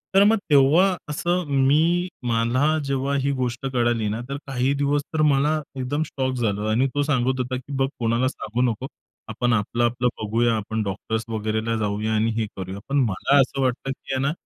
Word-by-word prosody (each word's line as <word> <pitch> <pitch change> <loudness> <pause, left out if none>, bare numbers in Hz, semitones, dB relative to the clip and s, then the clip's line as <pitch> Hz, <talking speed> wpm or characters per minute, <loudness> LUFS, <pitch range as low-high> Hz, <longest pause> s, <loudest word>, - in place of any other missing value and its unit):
तर 195 - +7
मग 225 - +4
तेव्हा 155 +7 +5
असं 175 +4 -1 0.2
मी 170 +5 +3 0.2
मला 130 +7 +2
जेव्हा 140 +1 -1
ही 140 - +1
गोष्ट 125 +2 -3
कळाली 120 -3 +1
ना 110 +3 -3
तर 140 - -3
काही 135 +1 0
दिवस 145 +1 +2
तर 155 - +1
मला 150 +2 +2 0.2
एकदम 145 +4 -1
शॉक 130 -1 -2
झालं 105 -4 -1
आणि 125 +5 +2
तो 145 - +2
सांगत 130 -2 +1
होता, 130 0 -2
की 135 +2 -9
"बघ 135 0 +2
कोणाला 115 +2 +1
सांगू 120 -1 -4
नको. 125 +5 -6 0.4
आपण 120 +2 0
आपलं, 115 +3 0
आपलं 120 +1 +1
बघूया. 115 +2 +1
आपण 110 +1 -2
डॉक्टर्स 110 +3 -3
वगैरेला 110 +1 -1
जाऊया 105 +1 -1
आणि 110 +1 +1
हे 110 - -1
करूया." 95 +1 -5
पण 140 - +1
मला 140 +9 +2
असं 135 +1 -1
वाटतं, 130 +1 -1
की 135 - -6
आहे 130 - 0
ना 140 - +1
125 Hz, 190 wpm, -23 LUFS, 115-140 Hz, 0.4 s, तर